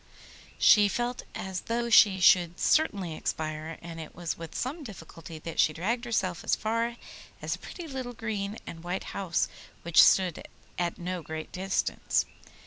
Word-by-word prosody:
She 205 -1 +7
felt 240 +4 -2
as 190 -1 -4
though 235 0 0
she 200 -3 +7
should 175 -2 +5
certainly 200 - +2
expire, 155 0 -4
and 165 -1 -7
it 160 - -9
was 170 -1 -3
with 165 -1 -9
some 290 +6 -3
difficulty 165 - -10
that 160 +1 -7
she 155 - +4
dragged 230 - -1
herself 190 -7 -1
as - - +2
far 230 +2 -1 0.4
as - - -2
a - - -6
pretty 350 - -8
little 260 -4 -5
green 215 -2 -3
and 165 0 -9
white 180 +2 -3
house, 185 -4 0 0.4
which 170 -1 +6
stood 185 -4 +4 0.4
at 175 -1 -1
no 180 -1 -4
great 160 0 -6
distance. 190 +1 0
185 Hz, 160 wpm, -28 LUFS, 165-230 Hz, 0.4 s, She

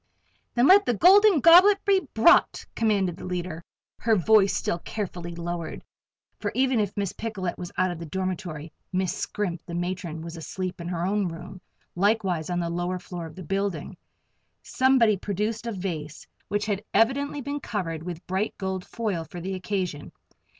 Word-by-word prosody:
"Then 240 +1 +4
let 400 +6 +7
the 245 - +2
Golden 385 - +6
Goblet 375 +6 +7
be 395 -2 +4 0.2
brought," 335 +11 +5
commanded 200 -6 +1
the - - -10
leader, 175 -2 -4 0.4
her 225 -1 +3
voice 200 +1 +4
still 170 - -1
carefully 175 -5 -5
lowered, 170 -1 -5 0.6
for - - -2
even 260 -2 +2
if 205 -1 -2
Miss 200 -2 -1
Picolet 205 -5 -4
was 180 -1 -6
out 185 0 +2
of 175 - -6
the 170 - -7
dormitory, 175 -3 -4 0.2
Miss 185 -1 0
Scrimp, 180 -5 -3
the 170 - -5
matron, 175 -2 -4
was 165 0 -7
asleep 180 +2 -5
in 170 - -6
her 175 -1 -2
own 200 0 +1
room, 175 +2 -8 0.3
likewise 190 -4 +1
on 175 0 -1
the 170 - -1
lower 175 +1 -2
floor 175 -2 -7
of 155 - -13
the 185 - -8
building. 195 -1 -2 0.7
Somebody 255 -6 +3
produced 210 +4 -3
a - - -1
vase 170 -7 -5 0.2
which 205 0 -1
had 205 -1 -2
evidently 280 +5 +2
been 285 +2 -4
covered 170 - -4
with 175 0 -7
bright 190 +4 -2
gold 190 -1 -3
foil 205 -8 -3
for 175 - -9
the 190 +3 -4
occasion. 185 -5 -3
190 Hz, 170 wpm, -26 LUFS, 175-220 Hz, 0.7 s, let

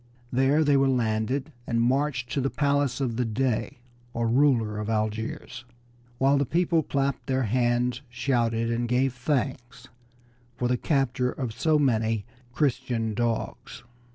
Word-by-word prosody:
There 135 +5 +3
they 145 -2 +3
were 135 0 +3
landed 125 +4 0 0.2
and 115 - 0
marched 130 0 0
to 140 - 0
the 135 - 0
palace 140 -3 +1
of 120 -4 -1
the 125 - +1
Dey, 120 +1 -1 0.4
or 115 0 0
ruler 115 -4 +2
of 105 +1 -4
Algiers, 110 +2 -3 0.5
while 135 +2 +3
the - - +3
people 170 -1 +2
clapped 140 -2 -2
their 130 0 +1
hands, 120 +2 +1
shouted, 120 -2 0
and 120 +1 -1
gave 125 +1 +2
thanks 125 -1 -3 0.7
for 125 - 0
the 125 - +2
capture 125 -2 0
of 125 -4 -4
so 155 +6 +2
many 115 -6 +1 0.3
"Christian 125 -5 -1
dogs." 115 +1 -3
125 Hz, 145 wpm, -26 LUFS, 115-135 Hz, 0.7 s, There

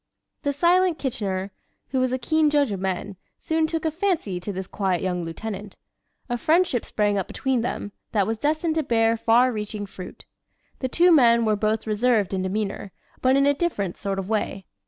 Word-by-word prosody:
The 285 - 0
silent 350 +3 +3
Kitchener, 200 -8 -3 0.4
who 265 - 0
was 255 -1 +1
a 255 - 0
keen 310 +5 +2
judge 290 -5 +2
of 195 - -3
men, 190 +1 -3 0.2
soon 320 0 0
took 325 0 -3
a 320 - +1
fancy 320 - -1
to 180 +4 -5
this 190 0 -5
quiet 190 -3 -1
young 180 -2 -1
lieutenant. 200 +4 -6 0.5
A 240 -1 -2
friendship 325 -5 +2
sprang 205 -1 0
up 190 - -3
between 265 -3 -1
them, 225 -3 -3 0.2
that 205 -3 +2
was 220 +1 -2
destined 310 +4 0
to 315 0 0
bear 225 -3 +2
far 235 +3 +4
reaching 210 -2 -4
fruit. 185 -2 -10 0.5
The 260 - -2
two 350 +6 +4
men 235 -6 +5
were 215 -1 +2
both 215 +1 0
reserved 215 -2 +1
in 190 - 0
demeanor, 195 +1 -3 0.3
but 260 +1 +4
in 275 0 +4
a 285 - +4
different 275 - -2
sort 195 -1 -3
of 195 -1 -3
way. 210 -3 -2
225 Hz, 195 wpm, -24 LUFS, 200-285 Hz, 0.5 s, men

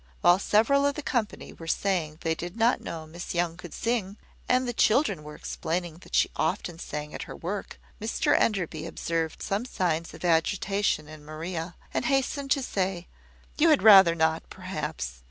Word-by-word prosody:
While 175 +2 +6
several 255 +8 +3
of 285 - -1
the 300 - -5
company 230 -6 -2
were 165 - -11
saying 165 -3 0
they 165 -1 +1
did 175 +5 -6
not 230 +2 +3
know 160 -1 -6
Miss 170 +3 -7
Young 170 -1 0
could 175 -2 -10
sing, 220 -4 -2 0.3
and 255 0 +3
the 245 - -2
children 235 - +3
were 150 0 -9
explaining 170 0 -4
that - - -7
she - - +3
often 170 -2 -1
sang 150 -2 -5
at - - -5
her - - -6
work, 195 +4 -5 0.2
Mr 220 - +1
Enderby 170 -6 0
observed 165 -1 -3
some 200 +3 -1
signs 170 -9 -1
of 160 - -7
agitation 180 0 +1
in 155 -1 -11
Maria, 165 +2 -5 0.2
and - - -1
hastened 275 +1 0
to 275 -1 +2
say, 185 -5 -2 0.5
"You 330 +2 +6
had 305 - +4
rather 195 -6 +9
not, 160 0 +2
perhaps. - - -5
175 Hz, 175 wpm, -27 LUFS, 160-220 Hz, 0.5 s, rather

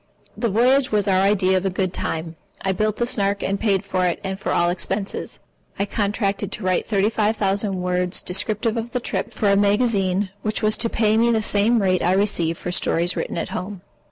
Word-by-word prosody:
The 235 - -1
voyage 255 +6 +3
was 210 -2 +1
our 190 -1 +3
idea 190 -1 +3
of 185 - -2
a - - +1
good 185 0 -2
time. 165 0 -3 0.3
I 195 - +1
built 215 +2 0
the 240 - 0
Snark 200 -4 0
and 195 +1 -1
paid 200 -3 +1
for 185 -2 0
it, 175 - -1
and 190 0 -4
for - - -3
all 175 0 +2
expenses. 195 +2 -3 0.4
I 200 - 0
contracted 205 -1 -1
to - - -6
write 185 -1 0
thirty 205 0 +1
five 215 0 0
thousand 195 -1 0
words 180 0 0
descriptive 215 +5 -1
of 230 +1 -4
the 250 - 0
trip - - -3
for 205 -3 +1
a - - +4
magazine 200 -2 +1
which 215 0 -2
was 215 0 +3
to 230 - 0
pay 215 -1 +2
me 235 +1 +3
the 220 -2 +1
same 210 +2 +2
rate 185 -1 +2
I 180 - +2
received 185 -5 +1
for 180 - -5
stories 175 0 +1
written - - -3
at - - -3
home. 185 0 -5
200 Hz, 215 wpm, -22 LUFS, 185-215 Hz, 0.4 s, a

